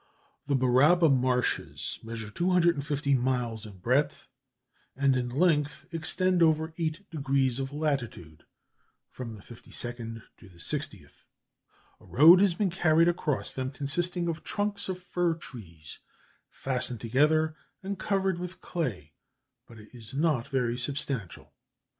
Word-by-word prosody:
The 140 Hz, -, +2 dB
Baraba 140 Hz, +7 st, +5 dB
marshes 130 Hz, -2 st, 0 dB
measure 115 Hz, -1 st, -6 dB
250 165 Hz, -4 st, +1 dB
miles 120 Hz, -3 st, -1 dB
in 100 Hz, -3 st, -12 dB
breadth, 135 Hz, +9 st, 0 dB, 0.7 s
and 135 Hz, 0 st, +3 dB
in 125 Hz, -1 st, -1 dB
length 150 Hz, 0 st, +1 dB
extend 180 Hz, +2 st, +1 dB
over 160 Hz, 0 st, +3 dB
eight 165 Hz, +4 st, -3 dB
degrees 135 Hz, -4 st, 0 dB
of 135 Hz, 0 st, -3 dB
latitude 135 Hz, -, -3 dB, 0.7 s
(from 115 Hz, -3 st, -7 dB
the 100 Hz, -, -13 dB
52nd 115 Hz, -1 st, -7 dB, 0.2 s
to 105 Hz, -, -15 dB
the 90 Hz, -, -19 dB
60th); 85 Hz, -, -6 dB, 0.7 s
a -, -, -19 dB
road 165 Hz, +8 st, +7 dB
has 195 Hz, -4 st, +3 dB
been 195 Hz, -1 st, 0 dB
carried 165 Hz, -2 st, +4 dB
across 155 Hz, -5 st, -1 dB
them, 130 Hz, 0 st, -3 dB
consisting 170 Hz, +6 st, -1 dB
of 165 Hz, -1 st, -3 dB
trunks 205 Hz, -1 st, -2 dB
of 185 Hz, -1 st, -3 dB
fir 175 Hz, -2 st, 0 dB
trees 90 Hz, -, -10 dB, 0.5 s
fastened 125 Hz, -3 st, -1 dB
together 150 Hz, +7 st, +2 dB, 0.3 s
and 195 Hz, 0 st, -4 dB
covered 195 Hz, -3 st, 0 dB
with 180 Hz, +1 st, -6 dB
clay, 110 Hz, -, -4 dB, 0.5 s
but 115 Hz, -, -14 dB
it 105 Hz, -1 st, -14 dB
is 120 Hz, +1 st, -10 dB
not 145 Hz, -5 st, +1 dB
very 125 Hz, -4 st, -1 dB
substantial. 135 Hz, -, -4 dB
140 Hz, 130 wpm, -28 LUFS, 120-170 Hz, 0.7 s, road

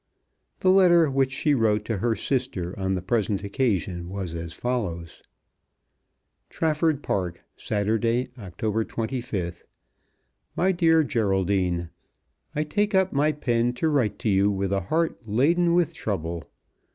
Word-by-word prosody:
The 185 Hz, -, +5 dB
letter 175 Hz, -5 st, +5 dB
which 135 Hz, 0 st, +1 dB
she 150 Hz, +2 st, +1 dB
wrote 110 Hz, -4 st, +2 dB
to 115 Hz, -4 st, -2 dB
her 115 Hz, +1 st, +1 dB
sister 110 Hz, -7 st, -2 dB
on 95 Hz, -1 st, -1 dB
the 90 Hz, -, -4 dB
present 105 Hz, -1 st, 0 dB
occasion 100 Hz, -6 st, -1 dB
was 95 Hz, -3 st, -5 dB
as 85 Hz, 0 st, -5 dB
follows; 90 Hz, -10 st, -3 dB, 1.3 s
Trafford 155 Hz, -2 st, 0 dB
Park, 90 Hz, -3 st, -2 dB
Saturday, 115 Hz, +4 st, 0 dB
October 105 Hz, +3 st, -2 dB
25th. 110 Hz, -8 st, -4 dB, 0.9 s
MY 190 Hz, +2 st, +2 dB
DEAR 165 Hz, -3 st, +4 dB
GERALDINE, 95 Hz, -, 0 dB, 0.6 s
I 150 Hz, -, +1 dB
take 205 Hz, +7 st, 0 dB
up 190 Hz, 0 st, +3 dB
my 145 Hz, +2 st, +3 dB
pen 120 Hz, -5 st, 0 dB
to 155 Hz, +6 st, 0 dB
write 130 Hz, -9 st, +1 dB
to 120 Hz, -2 st, -2 dB
you 100 Hz, +1 st, +3 dB
with 100 Hz, -1 st, -1 dB
a 100 Hz, -1 st, +1 dB
heart 155 Hz, -, -1 dB
laden 170 Hz, +10 st, +3 dB
with 175 Hz, -4 st, +2 dB
trouble. 85 Hz, -5 st, -4 dB
115 Hz, 135 wpm, -25 LUFS, 95-145 Hz, 1.3 s, The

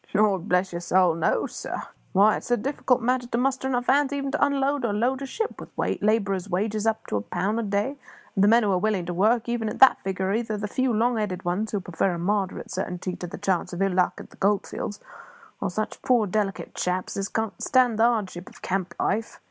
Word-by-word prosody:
"Lord 200 Hz, -4 st, +2 dB
bless 180 Hz, +1 st, +2 dB
your 170 Hz, -, -3 dB
soul, 180 Hz, -1 st, +3 dB
no, 165 Hz, 0 st, +1 dB
sir! -, -, -5 dB, 0.3 s
Why, 205 Hz, +2 st, +5 dB
it's -, -, -9 dB
a 245 Hz, -, +3 dB
difficult 250 Hz, 0 st, 0 dB
matter 250 Hz, 0 st, +1 dB
to 235 Hz, -, -2 dB
muster 265 Hz, +1 st, 0 dB
hands 245 Hz, -1 st, -1 dB
enough 280 Hz, +1 st, +3 dB
even 275 Hz, -1 st, -2 dB
to -, -, +1 dB
unload 280 Hz, 0 st, +1 dB
or 225 Hz, -3 st, 0 dB
load 250 Hz, +6 st, 0 dB
a 275 Hz, -, -4 dB
ship, 445 Hz, +10 st, -4 dB
with -, -, -9 dB, 0.3 s
labourer's 200 Hz, -3 st, +1 dB
wages 210 Hz, +4 st, -1 dB
up 220 Hz, 0 st, 0 dB
to -, -, -1 dB
a -, -, -1 dB
pound 195 Hz, -, -1 dB
a -, -, +1 dB
day; 210 Hz, +6 st, -1 dB, 0.4 s
and 195 Hz, -, +2 dB
the -, -, +6 dB
men 230 Hz, +2 st, +5 dB
who 205 Hz, -, +2 dB
are 185 Hz, -, +2 dB
willing 200 Hz, -3 st, 0 dB
to 175 Hz, -, -3 dB
work 220 Hz, +6 st, +2 dB
even 235 Hz, -2 st, -1 dB
at -, -, -5 dB
that 265 Hz, -, +7 dB
figure 190 Hz, 0 st, -2 dB
are -, -, +1 dB
either 220 Hz, -1 st, -1 dB
the 210 Hz, 0 st, -3 dB
few 255 Hz, +4 st, 0 dB
long 235 Hz, +2 st, +2 dB
headed 190 Hz, -4 st, -3 dB
ones 190 Hz, +5 st, -1 dB
who 205 Hz, -, 0 dB
prefer 180 Hz, +1 st, -1 dB
a -, -, -4 dB
moderate 195 Hz, +2 st, -1 dB
certainty 180 Hz, -1 st, -3 dB
to 175 Hz, -, -6 dB
the -, -, -7 dB
chance 190 Hz, -2 st, -1 dB
of 175 Hz, -, -4 dB
ill 195 Hz, -1 st, +1 dB
luck 180 Hz, 0 st, +2 dB
at -, -, -11 dB
the -, -, -17 dB
gold 200 Hz, 0 st, +2 dB
fields, 205 Hz, -, -5 dB, 0.6 s
or -, -, 0 dB
such 215 Hz, +4 st, -4 dB
poor 250 Hz, -5 st, +3 dB
delicate 200 Hz, 0 st, -2 dB
chaps 180 Hz, 0 st, -2 dB
as 195 Hz, 0 st, -2 dB
can't 220 Hz, -2 st, -3 dB
stand 250 Hz, -4 st, +3 dB
the -, -, +5 dB
hardships 205 Hz, -7 st, 0 dB
of -, -, -22 dB
camp 185 Hz, -1 st, -2 dB
life. 220 Hz, +3 st, -1 dB
210 Hz, 240 wpm, -25 LUFS, 190-240 Hz, 0.6 s, that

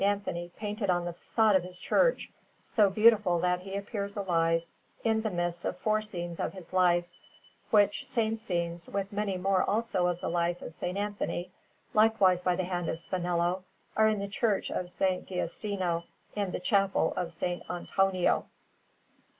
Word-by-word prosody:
Anthony 200 Hz, -4 st, -1 dB
painted 210 Hz, -1 st, -3 dB
on 175 Hz, -1 st, +2 dB
the 175 Hz, -, -3 dB
façade 215 Hz, +4 st, +2 dB
of 190 Hz, -, +5 dB
his 180 Hz, 0 st, -9 dB
church, -, -, +2 dB, 0.3 s
so 210 Hz, -4 st, +3 dB
beautiful 210 Hz, -3 st, +5 dB
that 180 Hz, 0 st, +2 dB
he 195 Hz, +1 st, -7 dB
appears 200 Hz, 0 st, -4 dB
alive, 165 Hz, -4 st, +1 dB, 0.4 s
in 220 Hz, -1 st, +2 dB
the 220 Hz, -, -1 dB
midst 175 Hz, -2 st, -2 dB
of -, -, -2 dB
four 215 Hz, -5 st, +1 dB
scenes 175 Hz, -5 st, -6 dB
of -, -, -2 dB
his 185 Hz, -2 st, -12 dB
life; 175 Hz, -2 st, +4 dB, 0.6 s
which 205 Hz, -1 st, +3 dB
same 225 Hz, -2 st, +1 dB
scenes, 170 Hz, -5 st, -3 dB
with 200 Hz, 0 st, -3 dB
many 200 Hz, -2 st, -1 dB
more 190 Hz, 0 st, +2 dB
also 205 Hz, -4 st, +1 dB
of 175 Hz, -1 st, -1 dB
the -, -, -3 dB
life 170 Hz, +1 st, 0 dB
of -, -, -5 dB
S. 160 Hz, -, -11 dB
Anthony, 190 Hz, -1 st, -2 dB, 0.4 s
likewise 215 Hz, -5 st, +4 dB
by 180 Hz, 0 st, +2 dB
the 185 Hz, -, -1 dB
hand 175 Hz, -2 st, -2 dB
of -, -, -2 dB
Spinello, 175 Hz, +1 st, -1 dB, 0.3 s
are 220 Hz, 0 st, +5 dB
in 215 Hz, -1 st, +2 dB
the 200 Hz, 0 st, -3 dB
Church 205 Hz, 0 st, 0 dB
of 180 Hz, -, -2 dB
S. 175 Hz, -, -11 dB, 0.3 s
Giustino, 180 Hz, -1 st, -2 dB, 0.3 s
in 200 Hz, -2 st, -1 dB
the -, -, -3 dB
Chapel 195 Hz, +1 st, +2 dB
of 180 Hz, -, -1 dB
S. 165 Hz, 0 st, -9 dB, 0.3 s
Antonio. 185 Hz, +1 st, +1 dB
190 Hz, 170 wpm, -30 LUFS, 175-205 Hz, 0.6 s, of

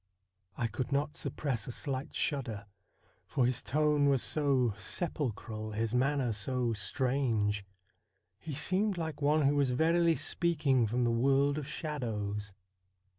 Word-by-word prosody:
I 120 Hz, -, 0 dB
could 115 Hz, +4 st, -3 dB
not 145 Hz, +2 st, 0 dB
suppress 140 Hz, -3 st, -3 dB
a -, -, -3 dB
slight 135 Hz, +2 st, -4 dB
shudder, 115 Hz, -9 st, -2 dB, 0.6 s
for 130 Hz, -, +1 dB
his 125 Hz, -1 st, 0 dB
tone 150 Hz, 0 st, +2 dB
was 135 Hz, -3 st, +2 dB
so 135 Hz, -7 st, +1 dB
sepulchral, 110 Hz, -, -4 dB
his 110 Hz, +1 st, -1 dB
manner 130 Hz, 0 st, +2 dB
so 120 Hz, +3 st, -1 dB
strange. 110 Hz, -2 st, 0 dB, 0.8 s
He 155 Hz, -4 st, -6 dB
seemed 185 Hz, +6 st, +1 dB
like 160 Hz, -3 st, -4 dB
one 150 Hz, +2 st, +3 dB
who 140 Hz, +1 st, +3 dB
was 140 Hz, -2 st, +3 dB
verily 165 Hz, +5 st, +3 dB
speaking 145 Hz, -11 st, +2 dB
from 120 Hz, +3 st, 0 dB
the 120 Hz, -, +2 dB
world 135 Hz, +4 st, +3 dB
of 145 Hz, -, -6 dB
shadows. 105 Hz, -10 st, -3 dB
135 Hz, 135 wpm, -32 LUFS, 115-150 Hz, 0.8 s, one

